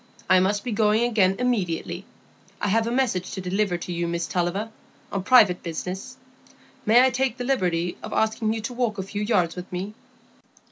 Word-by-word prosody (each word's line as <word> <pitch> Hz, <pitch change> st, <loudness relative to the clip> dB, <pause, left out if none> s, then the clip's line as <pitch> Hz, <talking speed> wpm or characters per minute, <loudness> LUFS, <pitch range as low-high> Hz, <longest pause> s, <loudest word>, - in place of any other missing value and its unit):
"I 185 Hz, -, +6 dB
must 205 Hz, +2 st, +1 dB
be 245 Hz, -, -3 dB
going 215 Hz, +1 st, +3 dB
again 210 Hz, -6 st, +3 dB
immediately. 185 Hz, -7 st, -1 dB, 0.5 s
I 205 Hz, -, -1 dB
have 225 Hz, +3 st, +2 dB
a -, -, -1 dB
message 235 Hz, -8 st, 0 dB
to 195 Hz, -, -4 dB
deliver 190 Hz, 0 st, 0 dB
to 175 Hz, +1 st, -6 dB
you, 170 Hz, 0 st, -1 dB
Miss 170 Hz, 0 st, -2 dB
Tulliver, 185 Hz, +5 st, -2 dB, 0.4 s
on 195 Hz, -, -1 dB
private 205 Hz, -5 st, +5 dB
business. 185 Hz, +9 st, -5 dB, 0.7 s
May 240 Hz, +4 st, +7 dB
I 260 Hz, -, +3 dB
take 260 Hz, -1 st, 0 dB
the 250 Hz, -, -4 dB
liberty 180 Hz, -9 st, 0 dB
of -, -, -7 dB
asking 220 Hz, 0 st, +1 dB
you 225 Hz, -, -3 dB
to 230 Hz, +3 st, -5 dB
walk 240 Hz, -4 st, -1 dB
a 190 Hz, -, -2 dB
few 205 Hz, +2 st, -5 dB
yards 205 Hz, -6 st, +1 dB
with 180 Hz, +1 st, -8 dB
me?" 185 Hz, +4 st, -4 dB
205 Hz, 190 wpm, -24 LUFS, 180-230 Hz, 0.7 s, May